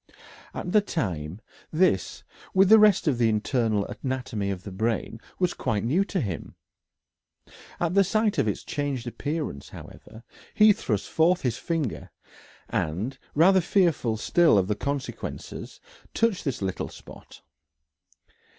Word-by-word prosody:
At 180 - -4
the 210 - +5
time 90 - -3 0.3
this, 160 - +1 0.3
with 190 0 +5
the 220 0 +9
rest 210 -5 +5
of 130 -5 +1
the 115 -2 +4
internal 110 -1 0
anatomy 125 -6 -4
of 95 -2 -4
the 100 - -8
brain, 110 +3 -2 0.2
was 180 -1 +1
quite 105 -3 -2
new 155 +12 +2
to 195 -2 -2
him. 95 - -5 1.2
At 170 0 0
the 200 0 +5
sight 215 -1 +1
of 130 - +2
its 105 - -2
changed 140 -4 -3
appearance, 145 - -4
however, 110 +1 -12 0.3
he 215 0 +7
thrust 105 - -2
forth 175 +3 +2
his 120 -3 -1
finger, 160 -8 -3 0.6
and, 105 - -2 0.2
rather 185 +5 +5
fearful 165 - +1
still 165 +2 +4
of 95 -2 +2
the 105 - 0
consequences, 140 +3 -5 0.4
touched 225 -6 +1
this 130 -8 -2
little 95 -1 -3
spot. - - -14
135 Hz, 140 wpm, -26 LUFS, 105-175 Hz, 1.2 s, the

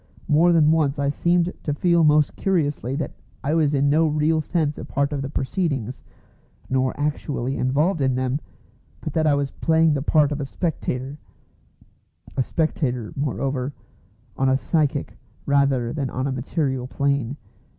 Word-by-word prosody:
More 165 +3 +4
than 155 -2 +5
once 150 -3 +2
I 140 0 0
seemed 175 +4 +1
to 145 - -2
feel 170 +1 +3
most 150 -1 +4
curiously 145 -8 0
that 145 0 -3 0.3
I 145 +3 0
was 150 -3 +2
in 140 +1 +2
no 155 +3 +4
real 155 +1 +2
sense 155 -2 -1
a - - -6
part 140 +1 -1
of 140 - -2
the 135 - -4
proceedings, 135 - -2 0.7
nor 130 0 0
actually 145 -3 -2
involved 150 +6 +1
in 130 -1 +2
them, 130 +2 -1 0.6
but 155 - -5
that 160 -1 +2
I 145 - +4
was 140 -2 -1
playing 160 -1 +3
the 140 - -1
part 150 0 +3
of 145 0 -2
a - - -2
spectator 140 -4 -3 1.2
a 135 - +2
spectator, 125 -6 -1
moreover, 135 -1 -2 0.6
on 135 0 +2
a 130 - +3
psychic 150 -1 0 0.3
rather 140 -4 +2
than 140 -4 -2
on 130 +2 -3
a 140 - -1
material 130 0 -2
plane. 140 -1 -1
145 Hz, 160 wpm, -23 LUFS, 135-155 Hz, 1.2 s, than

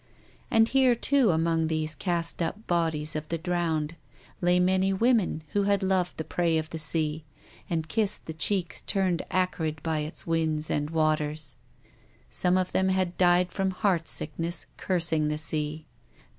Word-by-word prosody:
And 225 -3 +4
here, 260 -1 +4
too, 265 -1 +3
among 165 -1 +1
these 155 -1 -1
cast 170 +2 -2
up 205 +6 -3
bodies 160 -3 0
of 155 0 -3
the 165 - -1
drowned, 165 -2 -1 0.5
lay 175 0 +3
many 190 +1 +2
women 205 -6 +2
who 205 - +1
had 200 -1 +2
loved 190 -2 0
the 160 - -3
prey 165 +1 0
of 160 0 -3
the 160 - -4
sea, 155 0 -1 0.5
and 160 -3 -1
kissed 210 +1 -1
the 160 - -5
cheeks 175 +3 0
turned 185 -3 0
acrid 165 -4 -1
by 160 -2 0
its 150 +1 -6
winds 160 -2 0
and 145 0 0
waters. 155 -2 0 0.8
Some 180 +1 +2
of 185 -1 0
them 190 0 +2
had 185 -2 0
died 180 0 +3
from 195 -1 0
heart 185 -3 0
sickness, 170 0 -2
cursing 165 -4 +1
the 150 0 -1
sea. 155 0 -3
170 Hz, 160 wpm, -27 LUFS, 155-185 Hz, 0.8 s, And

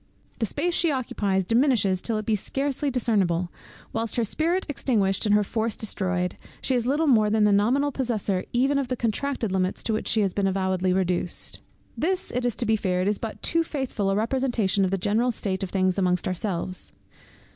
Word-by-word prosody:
The 225 - 0
space 345 - -1
she 340 -1 +2
occupies 200 -8 -1
diminishes 225 -5 +2
till 225 -2 0
it 215 - -4
be 220 - +2
scarcely 275 +6 -2
discernible; 195 -9 +1 0.4
whilst, 225 -1 -2
her 235 - +1
spirit 335 - 0
extinguished, 220 -8 0
and 205 - +4
her 210 - +4
force 220 +1 -1
destroyed, 185 -4 -1 0.2
she 265 - 0
is 245 -1 0
little 295 +5 +2
more 220 -7 +4
than 215 0 +2
the 210 - +4
nominal 250 +9 +2
possessor 215 -8 -1
even 270 +3 +2
of 275 - -2
the 255 - -1
contracted 235 0 -1
limits 185 -1 0
to 225 - 0
which 215 - -2
she 220 - +3
has 195 -3 0
been 200 -1 +1
avowedly 190 -1 0
reduced. 180 -1 0 0.3
This 370 +3 -1
it 245 0 0
is 240 - -1
to 240 - 0
be 220 0 +3
feared 185 -3 0
is 205 0 +1
but 225 -2 -6
too 330 0 +2
faithful 265 -10 -2
a 195 - +1
representation 225 -4 +1
of 190 - +2
the 195 - 0
general 220 +6 +1
state 190 -4 -2
of 190 - -3
things 185 0 +1
among 180 -1 +2
ourselves. 185 0 -2
215 Hz, 200 wpm, -25 LUFS, 190-255 Hz, 0.4 s, and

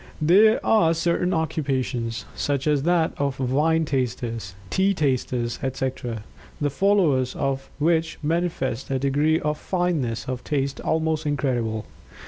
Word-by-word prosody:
There 200 +8 +5
are 165 -7 +4
certain 170 +2 +1
occupations, 135 -8 -1
such 140 -2 -1
as 150 -2 +2
that 165 +1 +2
of 140 -2 -1
wine 150 +5 +2
tasters, 120 -7 -3 0.2
tea 195 +1 +2
tasters, 125 -5 -1
etc., 130 -4 -3 0.4
the 145 -1 0
followers 155 -8 +2
of 135 -1 -2
which 165 +1 +1
manifest 155 -6 -1
a 135 - +1
degree 145 +4 +2
of 150 0 -2
fineness 170 - -1
of 125 -1 -4
Taste 140 -2 -1
almost 160 -1 0
incredible. 120 -7 -1
145 Hz, 125 wpm, -24 LUFS, 130-160 Hz, 0.4 s, There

